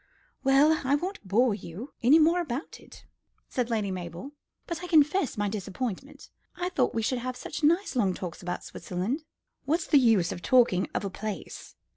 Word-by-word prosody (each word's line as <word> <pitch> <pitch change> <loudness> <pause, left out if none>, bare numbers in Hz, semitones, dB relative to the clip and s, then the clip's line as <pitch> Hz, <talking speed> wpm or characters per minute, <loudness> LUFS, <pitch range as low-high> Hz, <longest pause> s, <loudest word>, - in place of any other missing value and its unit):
"Well, 285 +4 +4
I 270 +2 +3
won't 355 - -4
bore 230 +4 +3
you 200 - -8
any 265 +7 +6
more 330 +3 +4
about 275 -2 -5
it," - - -16 0.4
said 250 -2 -1
Lady 215 -4 -1
Mabel, 180 - -6 0.3
"but 340 +1 -5
I - - -4
confess 305 - +3
my 205 0 0
disappointment. 215 +5 -5 0.2
I 360 0 -2
thought 260 -11 0
we 225 - 0
should 250 +3 0
have 250 +1 -4
such 295 +4 -6
nice 335 +3 +2
long 195 -7 +2
talks 175 -3 -6
about 175 0 -4
Switzerland." 190 - -4 0.4
"What's 320 +5 0
the 290 - +5
use 220 -9 +3
of 175 - -6
talking 230 -4 +3
of - - -1
a 195 - -3
place? 215 +1 -7
250 Hz, 180 wpm, -28 LUFS, 200-300 Hz, 0.4 s, any